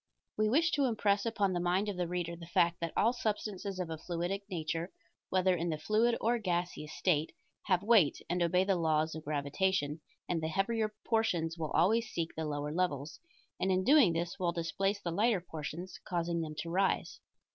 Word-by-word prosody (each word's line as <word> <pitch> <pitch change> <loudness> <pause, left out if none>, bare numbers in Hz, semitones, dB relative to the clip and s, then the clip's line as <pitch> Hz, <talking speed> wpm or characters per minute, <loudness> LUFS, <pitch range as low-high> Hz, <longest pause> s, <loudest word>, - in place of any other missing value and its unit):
We 215 0 +2
wish 320 +7 +3
to 285 -2 +2
impress 210 -3 +1
upon 205 -4 +1
the 175 - 0
mind 180 +4 +1
of 205 - -2
the 180 -1 -1
reader 175 -1 -3
the 170 0 -11
fact, 170 0 +2
that 170 -1 -2
all 230 +3 +4
substances 210 -4 -3
of 180 -3 -3
a 160 - -5
fluidic 175 +4 -2
nature, 165 0 -3 0.4
whether 185 0 +3
in 170 0 -2
the 155 - -1
fluid 215 +9 +2
or 235 +1 +1
gaseous 175 -5 -2
state, 160 -4 +1 0.3
have 185 -2 +2
weight, 205 -9 +5
and 175 +1 -1
obey 180 +2 +3
the 195 0 +2
laws 160 -1 +1
of 160 - -7
gravitation, 150 +1 -1 0.3
and 170 -2 -1
the 160 - -1
heavier 215 +5 0
portions 175 -8 +1
will 160 -3 -3
always 220 +7 +3
seek 165 -4 -3
the 160 - -3
lower 145 0 -3
levels, 155 -4 -1 0.4
and 190 - +1
in 185 0 +2
doing 265 - +6
this 170 +3 -3
will 175 -2 +1
displace 195 +4 -1
the 175 - -3
lighter 210 +3 +2
portions, 170 +1 -7
causing 170 -1 -1
them 155 -1 -5
to 165 - -6
rise. 190 +2 0
180 Hz, 195 wpm, -32 LUFS, 165-200 Hz, 0.4 s, doing